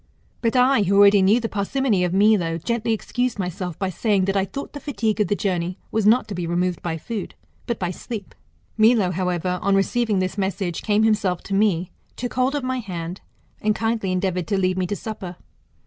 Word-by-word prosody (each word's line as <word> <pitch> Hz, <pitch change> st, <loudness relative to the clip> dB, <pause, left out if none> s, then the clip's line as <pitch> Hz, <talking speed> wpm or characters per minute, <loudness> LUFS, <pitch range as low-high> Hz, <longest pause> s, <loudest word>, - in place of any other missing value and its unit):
But 230 Hz, 0 st, 0 dB
I, 255 Hz, -1 st, +4 dB
who 200 Hz, 0 st, +2 dB
already 200 Hz, 0 st, +7 dB
knew 200 Hz, +5 st, +4 dB
the 230 Hz, -, -2 dB
parsimony 210 Hz, -1 st, 0 dB
of 180 Hz, -, 0 dB
Milo, 190 Hz, -4 st, +3 dB
gently 230 Hz, +6 st, -1 dB
excused 245 Hz, +2 st, -1 dB
myself 180 Hz, -2 st, -4 dB
by 190 Hz, -1 st, -2 dB
saying, 200 Hz, -1 st, +1 dB
that 195 Hz, +1 st, -1 dB
I 195 Hz, -1 st, +2 dB
thought 275 Hz, +9 st, -7 dB
the 290 Hz, -, -6 dB
fatigue 230 Hz, -7 st, -2 dB
of 210 Hz, -, +2 dB
the 205 Hz, -, +1 dB
journey 180 Hz, -2 st, -2 dB
was 220 Hz, -2 st, +1 dB
not 230 Hz, +1 st, +4 dB
to -, -, -4 dB
be 175 Hz, -2 st, -3 dB
removed 175 Hz, +1 st, -1 dB
by 165 Hz, -2 st, -3 dB
food, 210 Hz, +3 st, -6 dB, 0.3 s
but 235 Hz, -, -1 dB
by 180 Hz, -1 st, -2 dB
sleep. 205 Hz, +1 st, -7 dB, 0.4 s
Milo, 215 Hz, -4 st, +4 dB
however, 180 Hz, 0 st, -1 dB
on 200 Hz, 0 st, +2 dB
receiving 215 Hz, +2 st, +1 dB
this 185 Hz, +2 st, -1 dB
message, 190 Hz, -3 st, -2 dB
came 210 Hz, 0 st, +2 dB
himself 205 Hz, -5 st, +1 dB
to 195 Hz, -, -5 dB
me, 195 Hz, -4 st, +1 dB, 0.2 s
took 245 Hz, 0 st, -4 dB
hold 255 Hz, +3 st, +1 dB
of 285 Hz, -, -2 dB
my 255 Hz, 0 st, -1 dB
hand, 180 Hz, -4 st, -6 dB, 0.4 s
and 215 Hz, 0 st, +1 dB
kindly 225 Hz, -4 st, -1 dB
endeavoured 185 Hz, -2 st, -1 dB
to 200 Hz, -, 0 dB
lead 185 Hz, -1 st, +1 dB
me 185 Hz, -1 st, -1 dB
to 205 Hz, -, -2 dB
supper. 200 Hz, -5 st, -6 dB
200 Hz, 210 wpm, -23 LUFS, 180-225 Hz, 0.4 s, already